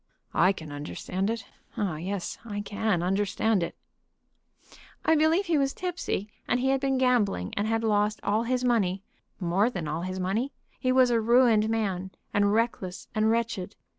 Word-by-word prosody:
"I 185 +3 +5
can 160 -6 -8
understand 180 +6 -3
it; 225 -2 -3 0.3
oh 195 -7 -1
yes, 185 +4 -4
I 205 -3 -4
can 205 -3 -1
understand 200 +2 +1
it." 170 - -3 1.3
"I 320 - +5
believe 320 +5 +3
he 330 -4 +2
was 275 0 0
tipsy, 355 - -3 0.2
and 245 - +2
he 265 +2 +1
had 270 0 +2
been 270 -1 +1
gambling, 230 - +1
and 205 +1 0
had 225 0 0
lost 210 -1 +2
all 210 +2 +2
his 250 +2 0
money 200 -6 +1 0.4
more 190 +5 +2
than 175 -10 -4
all 155 +3 -2
his 185 +1 -4
money. 215 +9 -1 0.3
He 255 - +1
was 255 -1 +5
a 230 -1 +3
ruined 230 -2 +4
man, 195 -5 -1 0.2
and 205 0 +3
reckless 210 -4 -1
and 215 0 +2
wretched. 225 -4 -1
215 Hz, 170 wpm, -27 LUFS, 190-245 Hz, 1.3 s, I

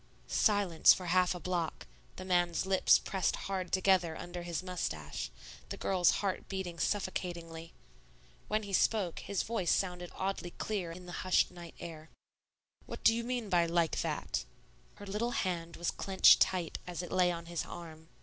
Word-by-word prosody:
Silence 200 -6 +4
for 185 - -7
half 180 +1 +3
a - - -6
block, 175 - -2 0.3
the 185 - -8
man's 175 -1 +1
lips 190 -1 +5
pressed 190 -4 -1
hard 190 -2 -4
together 185 -4 +3
under 175 0 -6
his 175 0 -4
mustache, 80 - -4 0.4
the - - -5
girl's 180 -3 +3 0.2
heart 190 - -2
beating 185 -3 -4
suffocatingly. 170 -4 -3 0.8
When 215 +1 0
he 200 -1 -7
spoke, 190 -3 +2
his 200 -3 -2
voice 215 -7 -1
sounded 180 -2 0
oddly 190 -2 -3
clear 195 -6 -2
in 180 +2 -10
the 175 - -8
hushed 185 -1 +3
night 175 -2 -11
air. 160 -2 -8 0.8
"What - - -8
do 225 - +7
you 235 +1 -2
mean 245 -2 -2
by 175 -3 +3
'like 170 -1 +1
that'?" - - -2 0.5
Her 205 - -10
little 215 +5 -2
hand 170 -2 -3
was 170 - -1
clinched 190 -1 +5
tight 180 -4 +1
as 180 0 -4
it 175 - -8
lay 180 -1 +3
on 170 -1 -5
his 170 -1 -3
arm. 160 -2 -10
180 Hz, 170 wpm, -32 LUFS, 170-190 Hz, 0.8 s, do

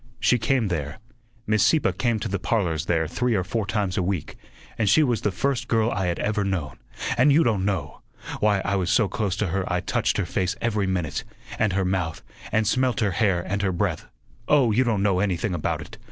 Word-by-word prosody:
She 125 - +3
came 115 -1 +1
there 75 -4 -3 0.5
Miss 105 -1 +2
Sieppe 160 - +3
came 120 -3 0
to 110 - -2
the 100 -1 -2
parlors 85 -7 -1
there 80 -2 +1
three 125 +7 0
or 95 - +1
four 105 +2 -2
times 100 -2 -1
a - - +2
week, 90 -3 -3 0.4
and 110 -3 +1
she 155 +11 +5
was 120 -6 0
the - - +1
first 125 +8 -1
girl 115 0 +2
I 95 -3 -1
had 85 - -1
ever 105 -1 0
known, 90 -9 -3 0.4
and 140 +4 +6
you 155 +4 +5
don' 105 -7 +1
know! 95 -8 -3 0.4
Why, 105 -2 +2
I 100 0 +1
was 90 -2 -1
so 110 - +3
close 95 0 -2
to 105 -3 -1
her 95 +3 -1
I 90 - +1
touched 110 +5 0
her 100 - 0
face 95 +2 -1
every 105 -4 0
minute, 90 -6 -2 0.4
and 110 -3 +2
her 95 0 +1
mouth, 90 -4 -2 0.3
and 110 0 +2
smelt 130 +3 +1
her 105 -4 +1
hair 90 -2 +1
and 100 +1 -1
her 95 -2 +1
breath 90 -2 -2 0.4
oh, 135 -6 +4
you 120 +5 +3
don't 110 -5 0
know 95 -3 +2
anything 95 0 0
about 80 -4 -2
it. - - -11
100 Hz, 225 wpm, -24 LUFS, 90-110 Hz, 0.5 s, and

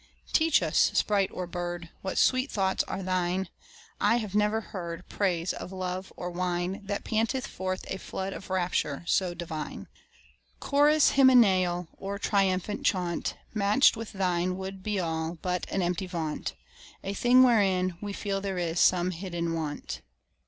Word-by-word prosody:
Teach 320 - +4
us, 160 0 +3
sprite 200 -2 +2
or 180 - -4
bird, 175 -1 -5
What 190 - -4
sweet 255 +2 +3
thoughts 190 -2 +1
are 195 - -4
thine: 185 0 0 0.5
I - - +4
have 215 -5 -2
never 210 +1 +2
heard 180 -5 -7
Praise 180 -3 0
of - - -7
love 185 0 -4
or 180 0 -4
wine 180 +2 -2
That 200 0 -3
panted 225 +4 0
forth 185 0 -4
a 190 - -4
flood 190 +1 -4
of 190 - -9
rapture 175 -5 -1
so 180 0 +1
divine. 165 -3 -6 0.7
Chorus 295 +1 +4
hymeneal 190 -10 +5
Or 200 +1 -4
triumphal 195 0 +1
chaunt, 180 -3 -1 0.2
Match'd 210 +6 +4
with 225 -1 -7
thine, 185 -1 0
would 190 0 -6
be 210 0 -1
all 160 -1 -2
But 180 0 -2
an 195 - 0
empty 180 +2 -1
vaunt 165 -4 -3 0.5
A 195 - -3
thing 245 +5 +5
wherein 190 -7 +3
we 205 -1 -4
feel 200 -1 -2
there 195 -2 -3
is 175 -1 -1
some 180 0 +4
hidden 170 -2 -3
want. 155 -3 -4
185 Hz, 155 wpm, -28 LUFS, 175-205 Hz, 0.7 s, hymeneal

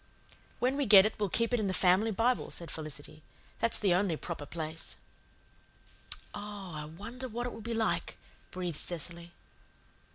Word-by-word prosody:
"When 255 +3 +1
we 285 -3 +1
get 200 -2 +10
it 215 - +1
we'll 205 -2 +1
keep 230 +5 +1
it 245 - +3
in 210 - 0
the 185 - 0
family 190 +4 +4
Bible," 230 +4 +1
said 170 -2 -6
Felicity. 155 -1 -6 0.4
"That's 230 - +3
the 195 -4 +3
only 180 -3 +2
proper 155 -4 -5
place." 160 -1 -4 1.4
"Oh, 205 -2 -6
I 150 -1 -5
wonder 210 +11 -6
what 240 +1 -3
it 245 - -3
will - - -8
be 230 +1 -3
like," 225 -1 0 0.3
breathed 180 -4 -3
Cecily. 170 0 -2
195 Hz, 165 wpm, -32 LUFS, 170-225 Hz, 1.4 s, get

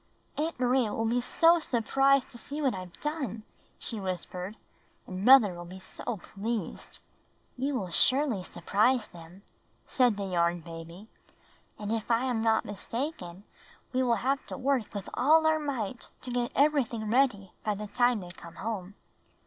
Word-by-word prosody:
''Aunt 315 -1 -2
Maria 250 -3 +2
will 225 - -1
be 240 +2 +1
so 335 +7 +4
surprised 270 0 +2
to 240 - -10
see 285 +5 -6
what 275 -4 +2
IVe 185 -2 -8
done," 280 - -3 0.3
she 225 - -5
whispered. 185 +1 -5 0.5
"And 185 0 -6
mother 245 -6 +8
will 175 0 -8
be 180 +2 -9
so 200 +4 -6
pleased." 210 +5 -5 0.5
"You 255 -6 -1
surely 265 - +4
will 185 - -6
surprise 220 +6 +1
them," 175 +3 -13 0.4
said 245 -5 +2
the 200 - -3
Yarn 175 -2 +1
Baby, 170 +4 -10 0.7
"and 210 0 -4
if 225 0 -2
I 235 +2 +2
am 245 -4 0
not 225 -1 +2
mistaken 205 - -5 0.5
we 255 - +2
will 240 -2 +3
have 275 +1 +1
to - - -5
work 260 -4 0
with 200 -2 -4
all 315 +5 +4
our 315 0 +4
might 255 -6 -4
to 250 - -6
get 245 -1 -1
everything 255 -7 +2
ready 225 -7 +2
by 210 -1 0
the 210 +1 -5
time 240 +1 +2
they 180 - -9
come 170 -2 -12
home." 200 -1 -5
225 Hz, 165 wpm, -29 LUFS, 195-260 Hz, 0.7 s, mother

